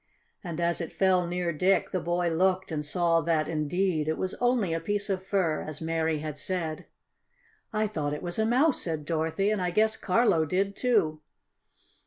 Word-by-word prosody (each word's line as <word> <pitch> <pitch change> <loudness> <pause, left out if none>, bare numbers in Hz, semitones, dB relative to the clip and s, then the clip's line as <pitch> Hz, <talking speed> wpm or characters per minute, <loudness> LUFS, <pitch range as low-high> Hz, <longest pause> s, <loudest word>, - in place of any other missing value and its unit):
And 170 -3 -5
as 170 0 +1
it 165 - -5
fell 185 -2 +2
near 175 -1 -1
Dick 185 +5 +2
the 185 - 0
boy 175 0 0
looked 185 +2 +1
and 150 -2 -2
saw 165 +2 +2
that, 160 -1 +1
indeed, 160 +1 0
it 155 - 0
was 185 - -2
only 245 -8 +2
a 165 - 0
piece 205 +3 -2
of 185 -1 -2
fur, 185 -5 0
as 155 -1 -6
Mary 160 -1 0
had 150 -1 -5
said. 165 -2 -3 0.8
"I 215 -1 +1
thought 150 -8 -2
it - - -8
was 175 +3 -3
a 220 - +3
mouse," 265 +5 +3
said 160 -3 -3
Dorothy. 165 +5 0
"And 210 -3 0
I 180 - 0
guess 220 +4 +2
Carlo 185 -5 +2
did, 195 +5 -1
too." 190 -12 +1
175 Hz, 190 wpm, -28 LUFS, 160-195 Hz, 0.8 s, a